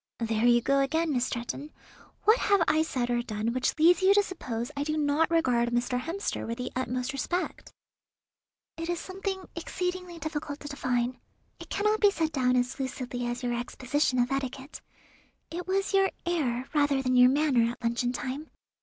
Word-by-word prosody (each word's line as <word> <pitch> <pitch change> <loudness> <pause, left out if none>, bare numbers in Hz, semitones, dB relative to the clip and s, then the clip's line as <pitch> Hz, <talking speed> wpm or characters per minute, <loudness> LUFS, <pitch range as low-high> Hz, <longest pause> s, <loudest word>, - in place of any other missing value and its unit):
"There 225 -1 0
you 240 0 +5
go 275 +2 +3
again, 315 +3 +1
Miss 250 -1 +1
Stretton. 240 +5 -4 0.5
What 440 +3 +5
have 400 -4 +3
I 315 - +3
said 255 -6 -1
or 240 0 +1
done 220 0 -2
which 255 +4 0
leads 340 +4 +5
you 385 +1 +5
to 410 - +5
suppose 245 - -5
I 285 - -1
do 310 +1 -1
not 300 +2 +2
regard 250 -8 +2
Mr. 240 +1 0
Hemster 335 +10 -3
with 230 +1 -3
the 250 - -4
utmost 255 +1 -2
respect?" 350 +6 -3 1.1
"It 330 +1 -4
is 345 -1 -1
something 380 0 -5
exceedingly 360 +1 -4
difficult 305 -2 -4
to 290 - -7
define. 250 -3 -1 0.4
It - - -10
cannot 425 +1 +1
be 410 - +7
set 325 -5 -1
down 255 -3 +2
as 250 +1 0
lucidly 250 -2 -3
as 240 +1 -4
your 240 -1 0
exposition 255 +3 -1
of 245 +2 +2
etiquette. 270 +1 -4 0.7
It 355 +2 -5
was 390 +2 0
your 390 0 +4 0.2
air, 265 -8 -1
rather 285 -3 +2
than 255 -1 +1
your 250 0 +8
manner 265 -5 +3
at - - -16
luncheon 235 +1 0
time. 260 +4 -5
275 Hz, 180 wpm, -28 LUFS, 245-330 Hz, 1.1 s, your